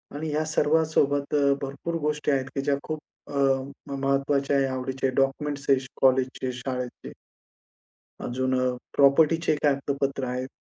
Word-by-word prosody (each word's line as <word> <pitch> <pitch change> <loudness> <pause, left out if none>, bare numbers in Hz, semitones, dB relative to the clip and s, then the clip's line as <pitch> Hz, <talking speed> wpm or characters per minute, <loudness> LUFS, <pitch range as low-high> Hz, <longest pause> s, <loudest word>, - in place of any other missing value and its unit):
आणि 155 +1 -3
ह्या 155 +1 0
सर्वांसोबत 150 -2 +1
अ, 140 -1 +4
भरपूर 140 +5 -4
गोष्टी 150 0 0
आहेत 135 -1 +1
की 135 - 0
ज्या 140 0 +1
खूप 155 -1 -4 0.3
अ, - - -9 0.5
म 140 - -5
महत्वाच्या 140 0 +1
आहे, 135 - +3
आवडीचे 130 0 -3
आहे. 130 - -3
डॉक्युमेंट्स 140 +1 0
आहे 135 -1 +3 0.2
कॉलेजचे, 130 -1 +2
शाळेचे. 125 0 -5 1.1
अजून 130 +1 -1
अ, - - +1 0.3
प्रॉपर्टीचे 155 +4 +4
एक 150 - 0
कागदोपत्र 140 -1 0
आहेत. 125 +1 -3
140 Hz, 145 wpm, -26 LUFS, 130-150 Hz, 1.1 s, अ